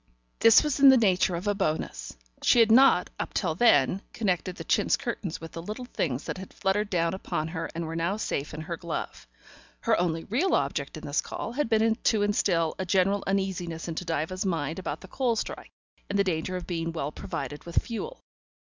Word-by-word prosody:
This 230 +4 +7
was 300 -2 -1
in 275 0 +9
the 265 - +8
nature 185 -5 +3
of 175 +4 -5
a 205 - +2
bonus: 155 - -3 0.2
she 245 - +4
had 225 -1 +5
not 245 -6 +6
up - - -4
till 170 -6 +1
then 185 - +4
connected 185 -4 -1
the - - -7
chintz - - +2
curtains 175 -6 -4
with 165 -1 -9
the 165 - -6
little 215 +8 -6
things 150 - -2
that - - -5
had 190 - -9
fluttered 200 +1 0
down 170 -3 +1
upon 160 -4 -3
her 165 -1 -4
and 170 0 -3
were 160 +1 -5
now 170 +5 0
safe 145 -8 -3
in 155 - -6
her 170 +2 -4
glove; 170 - -5 0.5
her - - +3
only 165 -2 0
real 285 - +1
object - - -2
in - - -9
this - - 0
call - - -5
had 270 0 -1
been 220 0 +3
to 220 -2 +1
instill 175 -5 +1
a - - 0
general 195 +2 +2
uneasiness 185 -4 -2
into 165 +1 -4
Diva's 170 +4 -2
mind 165 -4 -2
about 190 - -4
the 190 - -11
coal 245 +2 0
strike - - -5 0.4
and 200 - 0
the 200 - +4
danger 185 0 -2
of 180 -1 -5
being 165 -2 -2
well 150 -3 -3
provided 145 -1 -6
with 170 - -8
fuel. 465 - -6
185 Hz, 210 wpm, -27 LUFS, 165-210 Hz, 0.5 s, in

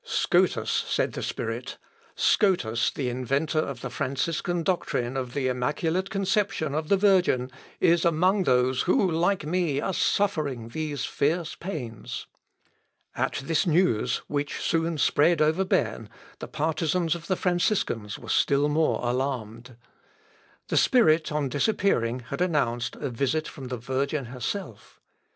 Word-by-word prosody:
"Scotus," - - +1
said - - 0
the - - -5
spirit, - - -4 0.4
"Scotus, 125 - +2
the 135 - -3
inventor 135 +6 0
of 140 -5 -3
the 130 - -5
Franciscan 160 +6 -1
doctrine 135 -8 -1
of 130 -2 -4
the 135 -2 0
immaculate 160 +9 -1
conception 195 -6 0
of 155 +1 -2
the 200 - +5
Virgin, 180 -11 +3 0.3
is 170 0 +4
among 185 +4 +2
those 125 0 +2
who 185 0 +3
like 175 +2 +1
me 160 -3 0
are 190 - -2
suffering 145 - 0
these 150 -1 -3
fierce 165 +3 -1
pains." 130 - -6 0.9
At - - -2
this 165 +3 +1
news, 165 - +2
which 145 0 -2
soon 165 -1 0
spread 155 +3 +3
over 155 +5 +3
Berne, 185 - -1 0.3
the - - -6
partisans 160 +2 0
of 170 -1 -7
the 185 - +1
Franciscans 175 - 0
were - - -12
still 140 +1 +3
more 150 -5 +1
alarmed. 120 -2 -3 0.9
The - - +1
spirit 165 -12 +4
on 150 -2 0
disappearing 130 - 0
had - - -4
announced 130 -9 0
a 140 - -4
visit 140 +6 -1
from 135 -2 -8
the 125 0 -4
Virgin 135 +4 -2
herself. 125 - -6
150 Hz, 135 wpm, -26 LUFS, 130-175 Hz, 0.9 s, the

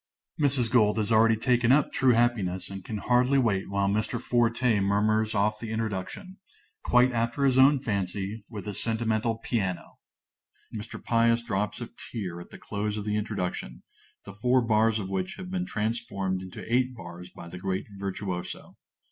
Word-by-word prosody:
(_Mrs. 130 -5 +2
Gold 110 -4 +4
has 110 +1 -1
already 115 0 +5
taken 120 +1 +2
up 140 +1 +4
"True 130 -2 +4
Happiness," 105 -7 0
and 95 -1 -7
can 110 - -5
hardly 125 +5 +3
wait 105 -8 +1
while 100 0 +1
Mr. 110 +4 0
Forte 120 -2 +2
murmurs 110 +2 +1
off 105 +1 +1
the 115 -1 -6
introduction, 110 - -4 0.5
quite 125 +1 +4
after 120 +4 0
his 130 -1 +4
own 140 +2 +7
fancy, 100 -2 -3
with 105 -4 -7
a 105 - -3
sentimental 115 +1 -1
piano. 100 -6 -3 0.8
Mr. 110 +1 -6
Pious 115 0 +3
drops 105 -2 -2
a - - -5 0.2
tear 90 -6 -4
at - - -12
the - - -11
close 105 0 -3
of 105 - -4
the 105 0 0
introduction, 90 - -3 0.4
the 100 - -9
four 125 +4 +2
bars 110 0 +3
of 100 -3 -4
which 95 -1 -3
have 185 -1 -8
been 185 -1 -2
transformed 105 - -2
into 95 -1 -8
eight 125 +2 +1
bars 90 -3 -9
by 85 - -11
the 90 +1 -8
great 95 +1 -2
virtuoso. 95 -2 -5
110 Hz, 170 wpm, -27 LUFS, 100-120 Hz, 0.8 s, own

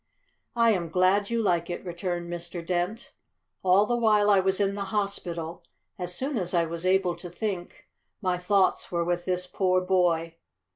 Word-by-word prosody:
"I 230 -1 +5
am 175 -5 -1
glad 185 +4 +2
you 235 -1 0
like 170 -4 +1
it," 175 - -5
returned 175 0 -3
Mr. 175 0 -6
Dent. 180 +5 -2 0.5
"All 190 +2 +4
the 240 - 0
while 210 -3 +4
I 200 - +6
was 190 0 +1
in 200 -1 +1
the 200 0 -3
hospital, 175 -5 -3 0.4
as 180 0 -4
soon 265 +3 -2
as 180 -1 -2
I 170 -1 +3
was 170 +2 -4
able 185 -2 +2
to 175 - -8
think, 185 -1 -5 0.3
my 185 -3 -1
thoughts 190 +1 +1
were 170 -1 0
with 175 0 -1
this 180 -1 -1
poor 185 0 +1
boy. 175 -3 +1
180 Hz, 180 wpm, -27 LUFS, 175-200 Hz, 0.5 s, I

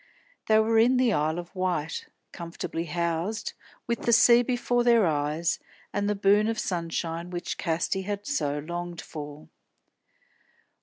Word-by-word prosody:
They 215 - +5
were 220 +1 +4
in 250 +3 +5
the 250 -3 +3
Isle 155 +1 +1
of 175 0 -7
Wight; 175 -4 -2 0.2
comfortably 170 -1 -5
housed, 170 +5 -2 0.3
with 235 0 -2
the 235 - +1
sea 235 +1 +7
before 245 0 0
their 235 -3 +5
eyes, 155 +1 0 0.3
and 205 0 0
the 210 - +1
boon 205 +2 +4
of 225 0 -1
sunshine 170 -2 -3
which 175 -1 -4
Casti 170 +3 0
had 205 +1 -4
so 150 - -1
longed 175 +3 -5
for. 150 -1 -8
180 Hz, 145 wpm, -27 LUFS, 165-220 Hz, 0.3 s, sea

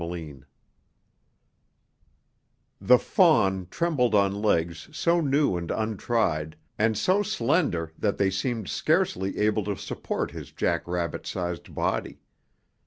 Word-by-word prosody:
chapter 85 +1 -4
2 75 -5 -10 2.4
The - - +6
fawn 95 -2 +3
trembled 135 - +1
on 100 -1 +3
legs 85 -6 -1
so 170 0 +1
new 140 - +2
and 85 -1 -5
untried, 110 -8 -1 0.2
and 110 0 +2
so 185 - +2
slender 160 - 0
that 105 -2 0
they 95 -1 +2
seemed 110 +1 -2
scarcely 95 +4 0
able 105 0 +1
to 100 -2 -2
support - - -4
his - - -9
jack - - -1
rabbit 85 -2 -3
sized 85 -1 -4
body. - - -2
100 Hz, 120 wpm, -26 LUFS, 85-120 Hz, 2.4 s, The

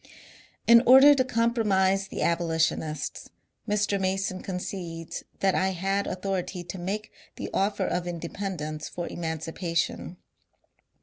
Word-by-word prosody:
In 235 0 +8
order 265 +3 +9
to 270 -2 +2
compromise 210 -6 +2
the - - -3
abolitionists, 160 -3 -1 0.4
Mr. 205 -1 +1
Mason 190 0 -1
con 185 -2 -4
cedes 170 -3 -6 0.2
that 195 -1 +3
I 190 0 +1
had 195 +3 -1
authority 185 -1 -3
to 185 +1 -7
make 205 +4 -4 0.2
the - - -6
offer 200 +1 +1
of 175 0 -2
independence 170 -3 -4
for 175 - -5
emancipation. 165 +1 -3
190 Hz, 120 wpm, -27 LUFS, 170-200 Hz, 0.4 s, order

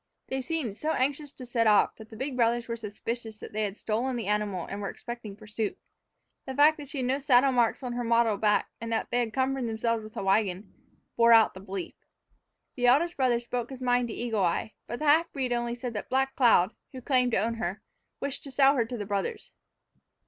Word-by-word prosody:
They 265 0 -1
seemed 265 -7 -2
so 310 +8 -1
anxious 285 +2 -1
to 255 - -10
set 235 -2 +1
off 210 -1 +4
that 220 -1 -12
the - - -11
big 265 +4 -4
brothers 235 -1 +1
were 230 - -2
suspicious 225 +1 -6
that - - -10
they 215 - -1
had 200 +1 -5
stolen 240 +4 -1
the 235 - -3
animal 205 -3 -1
and 200 +1 -6
were 200 - -3
expecting 235 -4 -8
pursuit. 215 +1 -4 0.7
The 265 - -4
fact 300 +3 +6
that 290 -2 -9
she 285 - -6
had 255 - -1
no 265 +2 +1
saddle 270 -1 +4
marks 245 +1 +1
on 245 -1 -3
her 245 0 -2
mottled 230 -3 +2
back, 210 -1 +2
and 230 0 -4
that 225 - -1
they 245 - +2
had 235 -2 -1
cumbered 260 +1 0
themselves 225 0 -1
with 215 0 -11
a - - -2
wagon, 195 0 0 0.4
bore 235 0 +6
out 225 -1 +6
the 185 - -10
belief. 195 -1 -6 0.8
The 245 -1 +1
eldest 330 +8 +4
brother 250 -3 +2
spoke 240 0 -4
his 265 -2 -8
mind 245 -1 +1
to 225 - -6
Eagle 225 -4 -1
Eye, 180 +5 0
but 240 - -4
the 305 - -4
half 320 +3 +4
breed 260 -3 -1
only 240 0 -1
said 245 -1 -5
that 210 - -5
Black 270 +1 +1
Cloud, 225 -6 +4 0.2
who 260 - -6
claimed 250 -3 +2
to - - +4
own 225 +4 0
her, 210 -1 -4 0.4
wished 280 -1 -4
to - - -7
sell 270 +1 +5
her 235 - +2
to 245 +1 -5
the 205 - -4
brothers. 200 -1 -3
235 Hz, 230 wpm, -28 LUFS, 215-260 Hz, 0.8 s, fact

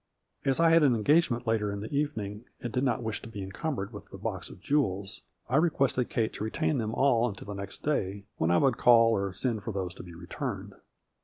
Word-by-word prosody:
As 135 +1 +1
I 165 -1 +5
had 165 0 +6
an 135 -5 +5
engagement 125 +1 +2
later 110 -2 +1
in 100 0 -4
the 110 - -6
evening 110 -7 -2
and 120 -2 -5
did 125 - +1
not 120 -3 +1
wish 110 -2 -3
to - - -9
be 105 -3 -6
encumbered 110 - -4
with 100 - -9
the - - -9
box - - -4
of - - -12
jewels, 100 -9 -1 0.3
I 130 - +2
requested 140 -6 +2
Kate 110 -2 0
to - - -5
retain 80 -7 0
them 110 0 -2
all 125 -3 +3
until 100 - -9
the 105 - -5
next 100 0 -7
day, 100 -9 -1
when 80 - +1
I 85 - +4
would 130 +1 +3
call 115 -1 +6
or 100 -3 0
send 110 +3 -2
for 110 - -4
those 95 -3 -3
to - - -10
be 85 -2 -11
returned. 85 +1 -5
110 Hz, 230 wpm, -29 LUFS, 100-130 Hz, 0.3 s, had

